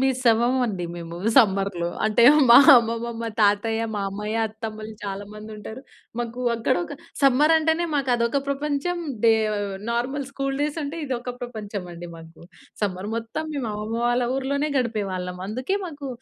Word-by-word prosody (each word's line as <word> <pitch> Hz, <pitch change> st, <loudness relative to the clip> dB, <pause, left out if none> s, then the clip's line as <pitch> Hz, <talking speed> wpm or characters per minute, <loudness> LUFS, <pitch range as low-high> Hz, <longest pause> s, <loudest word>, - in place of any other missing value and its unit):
మిస్సవ్వమండి 245 Hz, -5 st, +2 dB
మేము 170 Hz, 0 st, -7 dB, 0.2 s
సమ్మర్‌లో. 195 Hz, -7 st, +3 dB, 0.2 s
అంటే 220 Hz, +2 st, +3 dB, 0.3 s
మా 235 Hz, -, +11 dB, 0.2 s
అమ్మమ్మ, 230 Hz, 0 st, -2 dB
మా 230 Hz, -, -2 dB
తాతయ్య, 215 Hz, +2 st, +2 dB
మామయ్య, 205 Hz, +2 st, -3 dB
అత్తమ్మలు 220 Hz, 0 st, -7 dB
చాలా 200 Hz, 0 st, -4 dB
మందుంటారు. 215 Hz, +2 st, -9 dB, 0.4 s
మాకు 240 Hz, +1 st, -4 dB
అక్కడ 230 Hz, -, +1 dB
ఒక -, -, -7 dB, 0.3 s
సమ్మర్ 280 Hz, +4 st, +5 dB
అంటేనే 320 Hz, +2 st, +1 dB
మాకదొక 250 Hz, -2 st, +1 dB
ప్రపంచం 295 Hz, +5 st, -1 dB, 0.3 s
డే 225 Hz, -, +7 dB, 0.6 s
నార్మల్ 260 Hz, +4 st, -2 dB
స్కూలు 275 Hz, -1 st, -3 dB
డేసంటే 300 Hz, +1 st, -3 dB
ఇదొక 250 Hz, -2 st, -4 dB
ప్రపంచమండి 200 Hz, -7 st, -7 dB
మాకు. 165 Hz, 0 st, -14 dB, 0.4 s
సమ్మర్ 195 Hz, -1 st, -2 dB
మొత్తం 230 Hz, +7 st, -4 dB
మేము 265 Hz, -6 st, -3 dB
అమ్మమ్మ 215 Hz, +2 st, -4 dB
వాళ్ళ 240 Hz, +1 st, +2 dB
ఊరిలోనే 280 Hz, +3 st, -1 dB
గడిపేవాళ్ళం. 195 Hz, -7 st, -2 dB
అందుకే 255 Hz, -, -2 dB
మాకు 290 Hz, -4 st, -7 dB
230 Hz, 130 wpm, -24 LUFS, 210-270 Hz, 0.6 s, మా